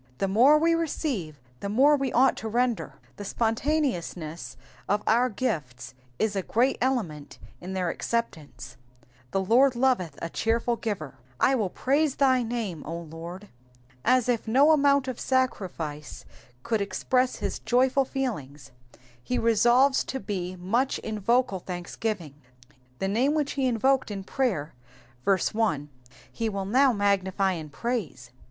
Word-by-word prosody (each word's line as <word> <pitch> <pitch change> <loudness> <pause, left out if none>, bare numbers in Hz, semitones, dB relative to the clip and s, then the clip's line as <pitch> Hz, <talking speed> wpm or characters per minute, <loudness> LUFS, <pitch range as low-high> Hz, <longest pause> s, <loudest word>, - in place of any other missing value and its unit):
The 195 - 0
more 245 +10 +6
we 330 +2 +3
receive, 270 - -2 0.2
the 200 - -4
more 275 +8 +5
we 270 -3 -1
ought 260 +3 +4
to 220 - -5
render. 240 0 -1 0.2
The 205 - -6
spontaneousness 195 - -2 0.3
of 205 +1 +1
our 240 +3 +3
gifts 135 - -3 0.2
is 220 -2 0
a 195 - 0
great 245 +8 +1
element 205 - -2 0.2
in 185 +2 -7
their 180 -3 -1
acceptance; 155 - -4 0.5
the 195 +6 -1
Lord 255 +5 +4
loveth 235 - +1
a - - -3
cheerful 230 +6 0
giver. 170 - -5
/ 125 -2 -31
toiU 230 -8 +2
praise 285 +2 +1
thy 260 -2 +3
name, 225 -9 -3
0 165 +2 -6
Lord.^^ 170 +5 -8 0.6
As 255 -1 +3
if 235 -2 0
no 275 +7 +5
amount 280 -2 +3
of 255 -2 -4
sacrifice 180 - -2 0.4
could 225 -3 0
express 250 +5 0
his 205 -2 -4
joyful 260 +2 +2
feelings, 210 - -5 0.5
he 250 - -1
resolves 240 +4 +4
to 265 - -4
be 185 -3 -4
much 220 +9 0
in 220 -1 -5
vocal 235 -2 +1
thanksgiving. 175 -2 -4 0.6
The 195 - -2
name 250 +9 +1
which 295 -2 0
he 270 -2 0
invoked 260 +2 +2
in 200 -2 -5
prayer 190 - -1 0.5
(verse 195 0 +1
1), 165 -10 0 0.4
he 230 -1 -2
will 195 -2 -3
now 260 +6 +4
magnify 195 -2 +1
in 160 -4 -5
praise. 165 - -4
225 Hz, 145 wpm, -26 LUFS, 180-255 Hz, 0.6 s, more